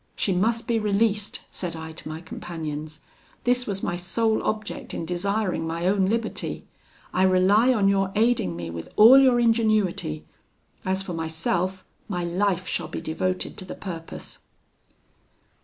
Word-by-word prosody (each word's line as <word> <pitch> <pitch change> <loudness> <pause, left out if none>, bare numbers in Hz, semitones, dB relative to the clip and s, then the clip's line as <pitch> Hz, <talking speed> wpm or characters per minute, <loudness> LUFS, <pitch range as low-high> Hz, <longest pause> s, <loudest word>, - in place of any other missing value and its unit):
'She 195 - 0
must 225 +6 +1
be 230 -2 +2
released,' 210 0 +1
said 175 -3 -4
I 160 0 -7
to 160 - -9
my 155 +1 -6
companions: 155 -2 -6 0.4
'this 250 0 +2
was 195 -2 -3
my 175 - -1
sole 220 +5 0
object 215 -1 -3
in 165 - -3
desiring 180 -1 -1
my 165 +1 -3
own 190 0 +3
liberty. 225 +2 -2 0.5
I 185 - +1
rely 190 +6 +5
on 210 -6 +3
your 195 -1 +2
aiding 220 - +2
me 85 -1 -5
with 85 0 -7
all 240 +6 +9
your 255 -3 +5
ingenuity; 215 - +1 0.6
as 190 +1 -1
for 185 - -5
myself, 170 +3 -2 0.2
my 180 -4 -2
life 185 +1 0
shall - - -2
be - - -5
devoted 185 +3 -2
to 185 - -7
the - - -7
purpose.' 165 -4 -7
190 Hz, 155 wpm, -25 LUFS, 170-215 Hz, 0.6 s, all